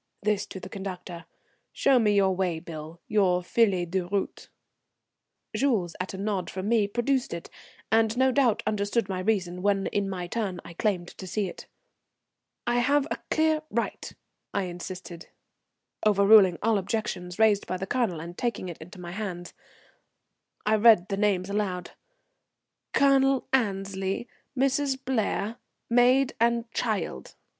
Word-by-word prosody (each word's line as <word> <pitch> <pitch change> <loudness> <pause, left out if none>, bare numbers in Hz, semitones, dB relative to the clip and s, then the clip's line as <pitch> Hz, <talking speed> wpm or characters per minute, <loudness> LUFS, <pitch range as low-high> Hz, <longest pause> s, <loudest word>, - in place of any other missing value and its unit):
this 210 -1 0
to 190 - -7
the 185 - -8
conductor. 185 -3 -7 0.5
"Show 270 -2 +4
me 210 -3 +3
your 190 -2 +3
way 180 -3 -1
bill, 160 0 -9
your 185 -4 +2
feuille 190 -3 +2
de 190 +3 0
route." 195 +2 -3 1.1
Jules 210 -11 +1
at 185 +1 -4
a - - -7
nod 195 -2 -2
from 190 +1 -4
me 220 -2 +3
produced 240 0 0
it, 170 - -9 0.4
and 225 +1 +3
no 260 0 +4
doubt 255 -5 +2
understood 210 +1 0
my 190 -2 -3
reason 185 -3 -1
when 200 0 +1
in 200 -1 -1
my 180 -2 -4
turn 190 -2 -3
I 170 - -9
claimed 180 -1 -1
to 185 - -10
see 200 +2 -1
it. - - -9 1.0
"I 240 0 +2
have 280 +3 +3
a - - -2
clear 315 -1 +2
right," - - -3 0.4
I 200 - +1
insisted, 180 -1 -7 0.8
overruling 200 -3 +6
all 220 -2 +3
objections 185 -3 -3
raised 215 -2 +3
by 185 - -2
the 190 - -4
Colonel; 215 -7 0
and 170 +2 -8
taking 235 -5 -2
it 170 - -8
into 180 +4 -11
my 175 -1 -7
hands 180 -3 -5 1.1
I 215 +1 +3
read 215 -4 +6
the 195 - -1
names 195 -3 +1
aloud, 190 -4 -2 1.0
"Colonel 270 -1 +3
Annesley, 195 -2 -1 0.3
Mrs. 275 +1 +1
Blair, 225 -3 -1 0.3
maid 250 +3 +4
and 235 0 +1
child." 200 - -3
200 Hz, 150 wpm, -27 LUFS, 180-230 Hz, 1.1 s, overruling